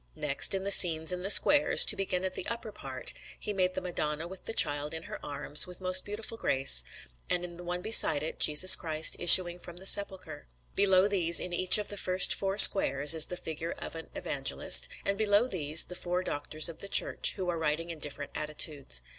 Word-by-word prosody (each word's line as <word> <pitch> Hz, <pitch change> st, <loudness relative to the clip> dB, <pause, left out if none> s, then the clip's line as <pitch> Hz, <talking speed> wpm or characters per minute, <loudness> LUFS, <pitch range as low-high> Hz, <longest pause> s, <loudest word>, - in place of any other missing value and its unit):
Next, 145 Hz, +6 st, -2 dB
in 190 Hz, -, -6 dB
the 200 Hz, -, -4 dB
scenes 160 Hz, -3 st, +4 dB
in 180 Hz, 0 st, -6 dB
the 195 Hz, -, -5 dB
squares 295 Hz, +7 st, +5 dB
to -, -, 0 dB
begin 190 Hz, -2 st, -5 dB
at 185 Hz, -, -6 dB
the -, -, -9 dB
upper 235 Hz, -2 st, -7 dB
part 130 Hz, -8 st, -8 dB, 0.3 s
he 210 Hz, -, -7 dB
made 185 Hz, -1 st, -3 dB
the -, -, -6 dB
Madonna 160 Hz, -3 st, -6 dB
with 190 Hz, +1 st, -13 dB
the -, -, -5 dB
Child 145 Hz, -3 st, -2 dB
in 160 Hz, -, -9 dB
her 210 Hz, +3 st, -12 dB
arms, 145 Hz, +2 st, 0 dB
with 180 Hz, -1 st, -13 dB
most 185 Hz, 0 st, +1 dB
beautiful 220 Hz, +2 st, -9 dB
grace; 135 Hz, -, +2 dB, 0.5 s
and 180 Hz, 0 st, -3 dB
in 175 Hz, -1 st, -13 dB
the 175 Hz, -, -11 dB
one 180 Hz, +1 st, -7 dB
beside 160 Hz, -9 st, +3 dB
it, 160 Hz, -, -8 dB
Jesus 155 Hz, +5 st, +6 dB
Christ 155 Hz, -2 st, 0 dB
issuing 175 Hz, 0 st, +5 dB
from 175 Hz, 0 st, -15 dB
the 190 Hz, -, -11 dB
Sepulchre. 190 Hz, -7 st, 0 dB, 0.3 s
Below 190 Hz, -1 st, +1 dB
these, 175 Hz, -5 st, -1 dB
in 180 Hz, -, -8 dB
each 185 Hz, +3 st, +2 dB
of 210 Hz, -, -7 dB
the 205 Hz, -, -7 dB
first 185 Hz, -1 st, +1 dB
four 195 Hz, 0 st, -5 dB
squares, 145 Hz, -8 st, +6 dB
is 160 Hz, -2 st, +4 dB
the 180 Hz, -, -8 dB
figure 160 Hz, +1 st, -8 dB
of -, -, -10 dB
an 165 Hz, 0 st, -12 dB
Evangelist; -, -, 0 dB, 0.2 s
and 200 Hz, +1 st, -4 dB
below 210 Hz, +1 st, 0 dB
these, 160 Hz, -, 0 dB
the 180 Hz, -, -11 dB
four 180 Hz, +1 st, -5 dB
Doctors 155 Hz, -1 st, -3 dB
of 165 Hz, -, -12 dB
the 200 Hz, -, -9 dB
Church, -, -, +1 dB
who 185 Hz, -3 st, -7 dB
are 170 Hz, -2 st, -5 dB
writing 160 Hz, +2 st, -4 dB
in 165 Hz, -, -12 dB
different 145 Hz, -1 st, -8 dB
attitudes. 150 Hz, -, -4 dB
175 Hz, 215 wpm, -27 LUFS, 155-190 Hz, 0.5 s, Jesus